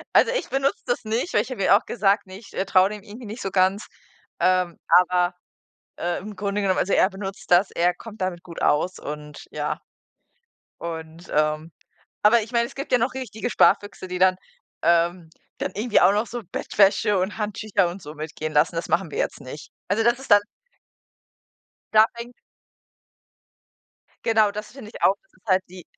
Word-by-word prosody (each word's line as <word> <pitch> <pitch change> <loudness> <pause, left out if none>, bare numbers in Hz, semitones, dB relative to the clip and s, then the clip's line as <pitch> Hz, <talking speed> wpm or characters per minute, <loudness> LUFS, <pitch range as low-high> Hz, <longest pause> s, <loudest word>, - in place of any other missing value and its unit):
Also 470 - +6
ich - - -2
benutze 275 +1 0
das 245 - -1
nicht, 225 +10 -2
weil - - +4
ich - - -7
habe 230 -6 -3
ihm - - +2
auch 205 +4 +5
gesagt 205 -2 +1
ne, 185 0 -9
ich, 220 - -16
äh, 190 - -1
traue 190 0 +4
dem 210 -1 -8
irgendwie 225 +2 -10
nicht 215 +4 -7
so 195 - -3
ganz, 190 +2 +2 0.5
ähm, 185 -2 +2
aber, 180 0 +4 0.6
äh, 175 0 -2
im 210 +2 -8
Grunde 200 +1 -2
genommen 190 -2 +1
also 200 - 0
er - - +5
benutzt 195 -1 -6
das. 180 +3 +5
Er 175 +1 +1
kommt 220 +3 -12
damit 185 -2 -2
gut 170 -3 -9
aus 175 +5 +1
und 150 0 -8
ja. - - -3 1.0
Und, 165 +1 -7
ähm 155 +2 0 0.5
aber 225 +2 +5
ich 220 +3 -9
meine, 235 -1 +2
es - - -13
gibt 275 0 -6
ja 250 - +6
noch 245 +3 0
richtige 245 -3 -4
Sparfüchse, 205 -4 +2
die 180 0 -4
dann 185 0 +4 0.5
ähm, 170 0 +2 0.3
dann - - -3
irgendwie 220 +2 +2
auch 180 +2 +6
noch 210 +3 0
so 240 +1 -6
Bettwäsche 200 0 +2
und 190 +4 -2
Handtücher 210 -3 0
und 180 +2 -8
so 150 0 -9
mitgehen 155 0 -5
lassen. 155 +3 +2
Das 165 - -3
machen 170 -3 +1
wir - - -7
jetzt - - -2
nicht. 135 +3 -10 0.2
Also, 210 +4 +1
das 240 +1 +3
ist 265 - -12
dann 205 0 +7 1.5
Da 215 0 +8
fängt 240 +1 -9 1.9
Genau, 220 -2 +4
das 210 +1 -7
finde 255 -6 -10
ich - - -10
auch, 195 - +4
das 310 - -38
ist - - -29
halt 185 -1 +3
die 180 0 -11
195 Hz, 190 wpm, -24 LUFS, 175-220 Hz, 1.9 s, Da